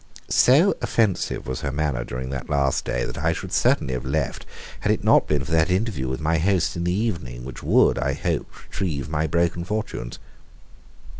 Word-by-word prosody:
So 155 +11 +5
offensive 110 -5 0
was 65 -1 -4
her 70 - -2
manner 70 -4 -1
during 65 +2 -5
that 70 - -5
last 70 -2 +1
day, - - -1
that - - -6
I 80 +2 +1
should - - -7
certainly 65 - +2
have 60 - -3
left 70 +1 -2 0.3
had - - +1
it - - -1
not - - +5
been 75 -3 +1
for - - -7
that 80 +1 +3
interview 90 - 0
with 65 +1 -3
my 80 +1 +1
host 95 +1 +1
in 85 0 -2
the 90 - +1
evening 85 - -2
which 65 -2 -8
would, - - +3
I 65 +3 0
hoped, 70 - -3
retrieve 75 -8 -3
my 80 0 0
broken 85 +1 0
fortunes. 105 - -4
75 Hz, 195 wpm, -23 LUFS, 65-90 Hz, 0.3 s, So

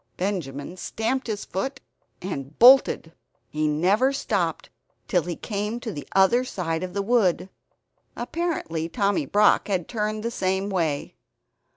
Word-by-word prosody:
Benjamin 175 -4 -3
stamped 235 +8 -2
his 210 -2 -3
foot, 230 +9 -3 0.4
and 145 -6 -5
bolted. 245 -9 +6 0.4
He 155 0 0
never 190 - +2
stopped 275 - -2 0.4
till 180 -4 +2
he 175 +1 -4
came 210 +4 -3
to 235 -2 -5
the 145 -4 -7
other 195 +6 +5
side 170 -9 -3
of 185 0 -5
the 200 - 0
wood. 195 -5 +1 0.6
Apparently 240 - -3
Tommy 200 - 0
Brock 210 +5 +4
had 185 -5 -1
turned 215 -1 -2
the 235 - -2
same 190 -1 -1
way. 160 -6 -1
195 Hz, 140 wpm, -25 LUFS, 170-225 Hz, 0.6 s, bolted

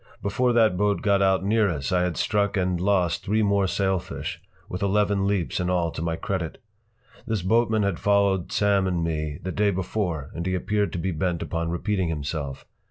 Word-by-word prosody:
Before 125 +5 +1
that 110 -6 +4
boat 105 +1 +1
got 100 -1 +3
out 95 -1 +3
near 105 +1 +2
us 70 -5 -3
I 90 -1 +3
had 90 -1 -1
struck 100 -1 +1
and 90 -2 0
lost 90 -4 +1
three 110 +2 +1
more 100 -1 +2
sailfish, 95 -1 -2 0.3
with 90 - -5
eleven 100 0 +2
leaps 100 -4 0
in 90 0 -1
all 85 -2 +1
to - - -6
my 85 0 -1
credit. 85 -2 -3 0.7
This 110 -5 -1
boatman 110 +1 +2
had 100 -4 -1
followed 100 -3 +2
Sam 100 -2 +2
and 90 -2 0
me 75 -2 -2
the 95 - -3
day 105 +1 +2
before 90 -6 -2
and 85 - -4
he 95 - 0
appeared 100 +3 0
to - - -2
be 90 +3 -1
bent 85 +1 -1
upon 85 0 -2
repeating 95 +1 -1
himself. 75 -2 -4
95 Hz, 195 wpm, -25 LUFS, 85-100 Hz, 0.7 s, that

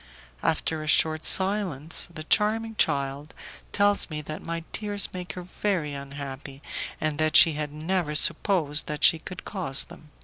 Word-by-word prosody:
After 160 -1 -1
a 155 - -7
short 155 0 +2
silence, 190 -6 +3
the 155 -2 -8
charming 225 +5 +1
child 140 -2 -1 0.4
tells 205 0 +2
me 150 -1 -5
that 155 +1 -7
my 165 0 -4
tears 205 -2 0
make 180 -1 -6
her 180 - -7
very 180 -4 -2
unhappy, 140 0 -8 0.4
and 155 -1 -2
that 155 0 +1
she 165 - +7
had 150 -1 -4
never 155 0 -2
supposed 155 -1 +2
that 150 -1 -5
she 165 - +6
could 185 - -9
cause 170 -10 -1
them. 155 - -15
155 Hz, 160 wpm, -26 LUFS, 150-185 Hz, 0.4 s, she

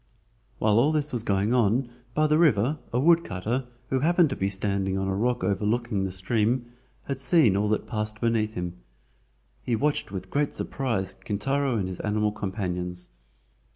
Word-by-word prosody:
While 110 +1 +3
all 140 +6 +4
this 150 -2 0
was 120 - -1
going 100 +1 +1
on 120 +1 +2 0.3
by 155 - +3
the 150 +1 +3
river 145 -2 +3
a 120 - +1
woodcutter, 130 - +1 0.2
who 130 - +2
happened 170 +1 +3
to - - -1
be 95 - -1
standing 95 -1 -1
on 95 0 -1
a 95 - 0
rock 120 +5 0
overlooking 105 0 0
the 95 - -3
stream, 115 +6 0 0.3
had 135 -1 -4
seen 130 - +4
all 105 +1 +1
that 110 - 0
passed 110 -1 -3
beneath 110 -2 0
him. 90 0 -4 0.8
He 120 - 0
watched 145 -3 0
with 95 -1 -6
great 145 0 0
surprise 110 -9 -2
Kintaro 135 +4 -1
and 95 -3 -1
his 90 -1 -6
animal 105 0 0
companions. 90 -3 -4
110 Hz, 170 wpm, -26 LUFS, 100-130 Hz, 0.8 s, all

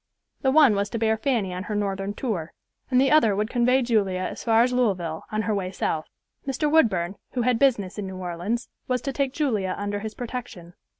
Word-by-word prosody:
The 265 - +2
one 280 -4 +6
was 200 0 0
to 230 - -3
bear 220 0 +2
Fanny 220 -6 -1
on 180 +2 -5
her 210 - -3
Northern 200 0 -2
tour, 190 -12 -3 0.4
and 255 -1 +4
the 270 +1 +3
other 230 -10 +5
would 210 +3 -1
convey 250 +2 +3
Julia 200 -6 +1
as - - -4
far 225 0 +4
as 250 +1 0
Louisville 185 -10 0
on 215 0 -1
her 215 - 0
way 190 -3 -2
South. 160 -4 -2 0.4
Mr. 295 +2 0
Woodburn, 195 - +2 0.2
who 245 - 0
had 245 -1 +2
business 210 -8 +2
in 200 - -4
New 190 0 -7
Orleans, 185 +6 -3 0.2
was 250 -1 -1
to 275 - -2
take 275 -1 0
Julia 230 -11 -1
under 205 0 -2
his 220 +1 -6
protection. 235 -8 -7
220 Hz, 215 wpm, -25 LUFS, 195-250 Hz, 0.4 s, one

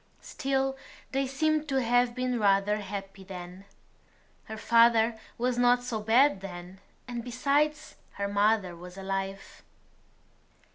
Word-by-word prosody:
Still 270 0 -1 0.4
they 270 0 0
seemed 310 +3 0
to 270 -1 +2
have 245 0 +2
been 250 -1 -1
rather 200 0 +3
happy 195 -1 -7
then. 185 0 -9 0.8
Her 220 - -7
father 230 0 +4 0.2
was 245 0 0
not 245 0 +4
so 235 -3 -3
bad 225 +1 +3
then; 180 0 -9 0.3
and 240 -1 -5
besides, 280 +5 0 0.2
her 200 0 -3
mother 205 -2 +1
was 180 +2 -11
alive. 195 0 -5
225 Hz, 125 wpm, -28 LUFS, 195-250 Hz, 0.8 s, father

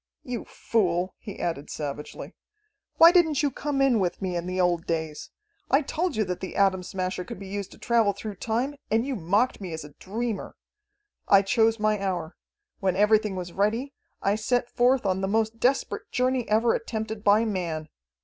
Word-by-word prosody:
You 250 -2 -5
fool," 185 -4 0
he 205 -4 -8
added 165 -4 -3
savagely, 150 -1 -6 0.6
"why 330 +1 +9
didn't 320 -5 +3
you 285 - +2
come 280 -1 -1
in 255 -5 +4
with 180 -2 -1
me 185 -2 -2
in 175 +1 -3
the 185 0 -2
old 175 -2 +1
days? 160 -2 -3 0.4
I 275 +3 +4
told 340 +4 -1
you 215 - +2
that 180 -2 -3
the 190 - -6
Atom 195 -2 +3
Smasher 185 0 -3
could - - -8
be 195 - -9
used 200 0 -4
to - - -15
travel 230 -3 +2
through 200 0 -7
time, 235 +8 -1 0.2
and 225 +2 +2
you 275 -1 -2
mocked 205 +7 +1
at - - -20
me 180 -4 -5
as 160 -1 -5
a 145 -1 -12
dreamer. 225 +2 -4 0.7
"I 195 0 +6
chose 225 +2 +2
my 215 -1 +1
hour. 180 -4 -2 0.4
When 190 -3 +1
everything 210 0 +3
was 180 -2 -5
ready, 225 +8 0 0.3
I 200 - +3
set 240 +3 0
forth 250 0 +3
on 190 0 +1
the 195 - 0
most 220 +2 0
desperate 265 +3 0
journey 255 -1 0
ever 225 +2 +3
attempted 220 -2 -4
by 210 +2 +5
man. 170 -7 -3
205 Hz, 190 wpm, -26 LUFS, 185-235 Hz, 0.7 s, why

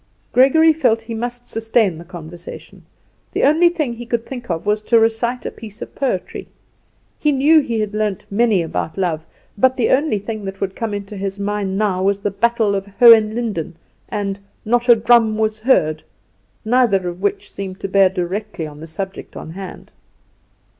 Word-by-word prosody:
Gregory 315 +6 +5
felt 240 -7 +1
he 230 0 -6
must 245 +2 -5
sustain 225 -6 +1
the - - -9
conversation. 170 -1 -10 0.5
The - - 0
only 320 +5 +5
thing 305 -8 -2
he 235 0 -9
could 235 -1 -1
think 245 -4 -8
of 165 0 -3
was 210 +1 +1
to 230 +2 +3
recite 230 +2 0
a - - -3
piece 215 -1 -11
of - - -8
poetry. 255 -10 -3 0.7
He 300 - +2
knew 295 +4 +5
he 235 -6 -2
had 210 -1 -3
learnt 210 -2 -2
many 210 -3 +2
about 160 +1 -4
love; 165 -4 -2 0.3
but 260 +3 +3
the 240 - +1
only 280 -4 +2
thing 215 +1 -6
that 195 0 -6
would 195 -1 -3
come 225 -3 -3
into 205 +1 -7
his 195 0 -4
mind 200 -1 -2
now 200 -3 0
was 195 +1 +2
the 200 0 -2
"Battle 230 0 +1
of 195 0 -2
Hohenlinden," 220 -7 +4 0.3
and 200 -1 -3 0.3
"Not 240 +2 +1
a 240 - +9
drum 225 -1 +3
was 215 0 0
heard," 155 - +2 0.6
neither 220 -6 +2
of 175 +1 -6
which 200 - -2
seemed 190 -1 -7
to - - -2
bear 195 0 +4
directly 190 0 -4
on 150 -1 -10
the 160 - -9
subject 190 +4 -6
on 160 - -8
hand. 190 +2 -9
215 Hz, 180 wpm, -19 LUFS, 195-240 Hz, 0.7 s, a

